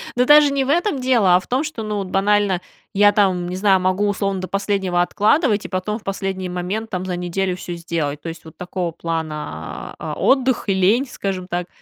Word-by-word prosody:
Ну, 250 Hz, +1 st, +3 dB
даже 295 Hz, +1 st, +7 dB
не 275 Hz, -1 st, +1 dB
в 265 Hz, -, -4 dB
этом 345 Hz, 0 st, +1 dB
дело, 235 Hz, -8 st, +4 dB
а -, -, +5 dB
в 185 Hz, -, -14 dB
том, 260 Hz, +4 st, 0 dB
что, 305 Hz, -8 st, -5 dB
ну, 210 Hz, -1 st, -3 dB
вот 195 Hz, -2 st, -3 dB
банально 195 Hz, -1 st, +2 dB, 0.3 s
я 205 Hz, 0 st, +5 dB
там, 185 Hz, -4 st, +1 dB
не 180 Hz, -, -4 dB
знаю, 190 Hz, 0 st, +3 dB
могу 185 Hz, +3 st, +1 dB
условно 195 Hz, -1 st, -1 dB
до 185 Hz, -, -4 dB
последнего 195 Hz, -3 st, 0 dB
откладывать 215 Hz, -, +2 dB
и -, -, -3 dB
потом 200 Hz, +4 st, -2 dB
в -, -, -24 dB
последний 195 Hz, -1 st, -3 dB
момент 185 Hz, +5 st, -3 dB
там 185 Hz, -3 st, -3 dB
за 180 Hz, -1 st, -2 dB
неделю 180 Hz, +1 st, -2 dB
всё 180 Hz, -1 st, -6 dB
сделать. 160 Hz, -4 st, -3 dB
То 165 Hz, -, -5 dB
есть 165 Hz, 0 st, -9 dB
вот 160 Hz, -, -14 dB
такого 180 Hz, -1 st, -3 dB
плана, 160 Hz, -2 st, -5 dB
а, -, -, -4 dB
отдых 260 Hz, -2 st, +2 dB
и -, -, +4 dB
лень, 200 Hz, +8 st, +3 dB
скажем 190 Hz, -5 st, -4 dB
так. 175 Hz, -1 st, -3 dB
195 Hz, 220 wpm, -20 LUFS, 180-215 Hz, 0.3 s, даже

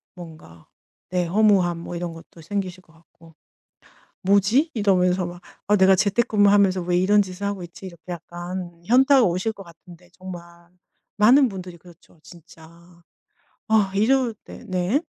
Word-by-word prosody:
뭔가. 155 Hz, -, -13 dB, 0.4 s
네 180 Hz, -1 st, -1 dB
허무함 185 Hz, -2 st, +2 dB
뭐 175 Hz, -, -8 dB
이런 170 Hz, -1 st, -5 dB
것도 165 Hz, 0 st, -15 dB
생기실 185 Hz, +1 st, -5 dB
것 165 Hz, -, -26 dB
같고. 165 Hz, 0 st, -22 dB, 0.9 s
'뭐지?' 205 Hz, -, +2 dB
이러면서 185 Hz, -4 st, +1 dB
막 175 Hz, 0 st, -10 dB, 0.2 s
'아 210 Hz, -, +3 dB
내가 190 Hz, -1 st, +5 dB
재택근무하면서 205 Hz, -2 st, +2 dB
왜 175 Hz, 0 st, -1 dB
이런 200 Hz, +3 st, +3 dB
짓을 185 Hz, 0 st, -8 dB
하고 200 Hz, -2 st, -4 dB
있지?' 175 Hz, +2 st, -11 dB
이렇게 170 Hz, -3 st, -13 dB
약간 175 Hz, +1 st, -8 dB
현타가 265 Hz, +3 st, +5 dB
오실 185 Hz, +4 st, -1 dB
것 195 Hz, -2 st, -12 dB
같은데 175 Hz, +1 st, -17 dB
정말 185 Hz, -2 st, -9 dB, 0.7 s
많은 250 Hz, +6 st, +5 dB
분들이 185 Hz, -3 st, -9 dB
그렇죠 170 Hz, -1 st, -20 dB
진짜. 165 Hz, -1 st, -16 dB, 1.0 s
아 210 Hz, -3 st, +2 dB
이럴 240 Hz, +3 st, +1 dB
때 -, -, -12 dB
네. 185 Hz, +9 st, 0 dB
185 Hz, 295 characters per minute, -22 LUFS, 175-205 Hz, 1.0 s, 내가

